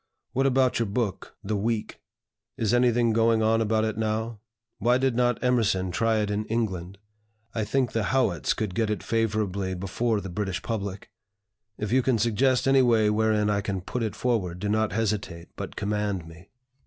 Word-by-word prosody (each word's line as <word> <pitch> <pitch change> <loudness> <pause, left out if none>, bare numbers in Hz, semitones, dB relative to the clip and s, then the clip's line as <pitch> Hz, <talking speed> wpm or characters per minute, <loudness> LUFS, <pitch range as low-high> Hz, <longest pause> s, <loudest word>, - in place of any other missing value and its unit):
What 135 +2 +2
about 130 -2 +2
your 115 - 0
book 105 -1 -3
(the 105 +2 -2
'Week')? 110 +2 -2 0.6
Is 115 -3 0
anything 120 -2 +3
going 115 0 +3
on 115 +1 +3
about 110 0 +1
it 110 0 -3
now? 110 0 -2 0.4
Why 120 +2 +3
did 130 -2 +1
not 120 -1 +2
Emerson 110 -7 +1
try 115 +5 +1
it 105 -1 -1
in 105 +1 -1
England? 95 -5 -2 0.6
I 110 - -1
think 125 +2 0
the 115 -3 -1
Howitts 110 - +1
could 105 -4 -3
get 110 0 0
it 105 - -2
favorably 100 -4 -1
before 105 +5 -1
the 95 - -6
British 95 -1 -3
public. 100 -3 -4 0.7
If 105 0 -3
you 130 +2 +4
can 130 -2 +2
suggest 125 +4 +2
any 135 0 +5
way 115 -4 +4
wherein 105 -1 +2
I 100 -1 +1
can 100 -1 -3
put 120 +7 -4
it 110 -3 -2
forward, 105 -9 -1
do 100 +3 -3
not 110 0 +1
hesitate, 105 -5 -2
but - - -6
command 100 -4 -2
me." 80 +3 -14
110 Hz, 180 wpm, -26 LUFS, 100-115 Hz, 0.7 s, any